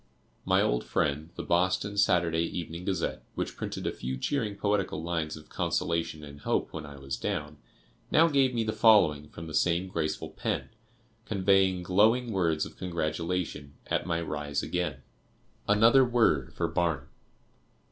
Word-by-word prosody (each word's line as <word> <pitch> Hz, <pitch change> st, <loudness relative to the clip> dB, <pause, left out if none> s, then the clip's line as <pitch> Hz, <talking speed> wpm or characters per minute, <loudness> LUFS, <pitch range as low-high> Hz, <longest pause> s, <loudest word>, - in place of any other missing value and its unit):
My -, -, +3 dB
old -, -, +1 dB
friend, 70 Hz, +5 st, -1 dB
the -, -, -5 dB
Boston 95 Hz, +4 st, +1 dB
Saturday 85 Hz, -4 st, +3 dB
Evening 85 Hz, +1 st, -4 dB
Gazette, 95 Hz, -4 st, -1 dB
which -, -, -3 dB
printed -, -, -5 dB
a -, -, 0 dB
few 65 Hz, +1 st, -4 dB
cheering 110 Hz, -, -1 dB
poetical 100 Hz, -5 st, -1 dB
lines 80 Hz, -2 st, -2 dB
of 75 Hz, -, -14 dB
consolation 85 Hz, -2 st, -1 dB
and 70 Hz, -1 st, -10 dB
hope -, -, -1 dB
when 80 Hz, -2 st, -6 dB
I 70 Hz, -1 st, -10 dB
was 70 Hz, 0 st, -5 dB
down, 75 Hz, 0 st, -3 dB, 0.5 s
now 165 Hz, +2 st, +5 dB
gave 135 Hz, -4 st, +3 dB
me 115 Hz, -2 st, 0 dB
the 110 Hz, 0 st, -2 dB
following 80 Hz, -10 st, +4 dB
from 80 Hz, -, -9 dB
the 80 Hz, -, -8 dB
same 85 Hz, +3 st, +2 dB
graceful 80 Hz, -3 st, -2 dB
pen, -, -, -3 dB, 0.6 s
conveying 95 Hz, -2 st, +3 dB
glowing 110 Hz, +7 st, +3 dB
words 85 Hz, -6 st, +1 dB
of -, -, -12 dB
congratulation 85 Hz, -3 st, -3 dB
at -, -, -1 dB
my 85 Hz, -1 st, 0 dB
rise 75 Hz, -3 st, -3 dB
again: 80 Hz, -7 st, -2 dB, 0.7 s
ANOTHER 115 Hz, +6 st, +6 dB
WORD 115 Hz, -, +2 dB
FOR -, -, 0 dB
BARNUM. 80 Hz, -5 st, -1 dB
85 Hz, 155 wpm, -29 LUFS, 75-100 Hz, 0.7 s, ANOTHER